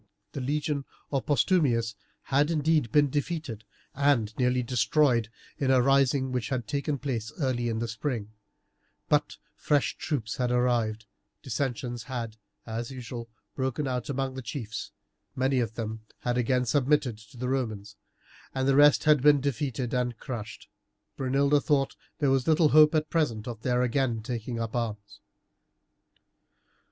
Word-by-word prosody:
The 140 - -5
legion 145 +1 -1 0.3
of 135 -2 -1
Postumius 135 - +2 0.3
had 145 +3 +2
indeed 155 -6 +1
been 145 0 +4
defeated 145 -7 -3 0.3
and 130 -6 +2
nearly 125 0 +1
destroyed 120 0 +2 0.3
in 135 - +1
a 130 -1 +5
rising 135 0 +3
which 125 -4 -2
had 130 -3 -2
taken 145 0 -1
place 120 -5 -3
early 125 -4 0
in 115 - -1
the 115 +1 -2
spring; 115 -2 -3 0.8
but - - +1 0.2
fresh 145 -2 +1
troops 120 -9 -3
had 125 -1 0
arrived, 120 -3 +1 0.4
dissensions 125 -2 -3
had, 115 -4 -5 0.3
as 115 +1 -4
usual, 120 -3 -7 0.3
broken 130 +2 -1
out 125 0 -3
among 135 -1 -1
the 130 - -6
chiefs, 110 -3 -5 0.4
many 130 0 +2
of 115 -2 -2
them 110 -1 -4 0.2
had 120 0 0
again 125 +1 +1
submitted 135 -3 +1
to 120 +4 -16
the 125 +1 -3
Romans, 110 -6 -3 0.6
and 130 0 0
the 135 - +4
rest 145 +1 +6
had 150 -3 +5
been 145 +1 +6
defeated 130 -2 -2
and 125 -2 0
crushed. 110 -4 -7 0.5
Brunilda 140 +2 +2
thought 135 -1 +2
that - - -20 0.2
there 140 -2 +3
was 135 +1 +1
little 160 -1 +5
hope 155 +1 +6
at 155 0 0
present 125 -9 0
of 115 -3 -6
their 125 0 +1
again 120 -3 0
taking 115 0 -4
up 115 0 -3
arms. 105 -4 -4
130 Hz, 150 wpm, -28 LUFS, 115-140 Hz, 0.8 s, rest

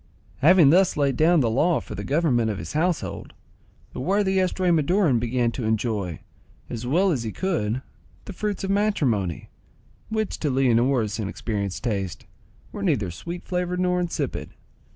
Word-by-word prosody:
Having 160 -1 +6
thus 185 0 +4
laid 140 -2 +2
down 165 0 +4
the 120 - +2
law 155 +7 +2
for - - -9
the - - -5
government 135 -7 +1
of 105 - -2
his 85 0 -7
household, 170 +2 -2 0.6
the - - -6
worthy 190 +6 +1
Estramaduran 175 - +2
began 120 0 0
to 120 - -5
enjoy, 110 -6 -1 0.5
as 120 +1 -5
well 180 +8 +3
as 135 -7 0
he 110 -2 -4
could, 130 - -2 0.4
the 200 - -7
fruits 205 +1 -3
of 195 - -1
matrimony, 135 - 0 0.6
which, 220 -2 -2
to 150 - 0
Leonora's 125 -3 +2
inexperienced 100 -2 -3
taste, 100 - -3 0.5
were - - -7
neither 95 -4 0
sweet 170 - -7
flavoured 180 0 -2
nor 180 0 +1
insipid. 175 -2 -3
140 Hz, 150 wpm, -24 LUFS, 115-180 Hz, 0.6 s, Having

